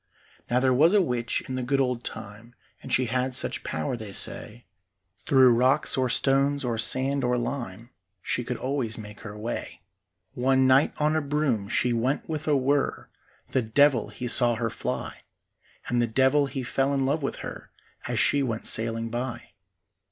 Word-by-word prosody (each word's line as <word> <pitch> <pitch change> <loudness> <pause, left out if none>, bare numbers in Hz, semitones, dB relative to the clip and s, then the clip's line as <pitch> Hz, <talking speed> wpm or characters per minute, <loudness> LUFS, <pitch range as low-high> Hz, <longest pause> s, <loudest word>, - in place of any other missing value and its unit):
Now 120 +2 +2
there 130 0 +2
was 160 +9 +4
a 205 - +5
witch 120 -6 -2
in 130 - -5
the 130 - -2
good 135 +3 0
old 125 -3 -1
time, 110 +3 -9 0.3
And 130 - -9
she 130 - +2
had 125 +2 -1
such - - -2
power, 80 +9 -3
they 110 -4 -8
say, 115 +3 -4 0.6
Through 130 -3 +6
rocks 130 +5 +2
or 130 -2 0
stones 135 +3 +1
or 115 -2 -2
sand 135 +4 +3
or 125 0 +1
lime, 120 -2 -5 0.3
She 125 - -1
could 120 0 -4
always 130 -4 -2
make 105 -1 -9
her 105 -1 -9
way. 115 +3 -6 0.5
One 130 +1 +2
night 130 +2 +4
on 150 +1 +1
a 155 - +1
broom 140 -8 -1
she 125 +2 +1
went 125 +4 -1
with 155 -1 -5
a 150 -2 +3
whirr; 135 +2 -1 0.4
The 130 - +1
devil 130 +1 +3
he 125 - -6
saw 120 0 +4
her 115 0 -2
fly, - - -5 0.7
And 120 0 +1
the 120 - +1
devil 130 +5 +2
he 135 -1 -5
fell 135 +3 0
in 135 -1 0
love 145 +4 0
with 135 - -3
her - - -9 0.4
As - - -2
she 145 - +3
went 115 -4 -3
sailing 115 0 +2
by. 120 0 -5
125 Hz, 180 wpm, -26 LUFS, 115-135 Hz, 0.7 s, Through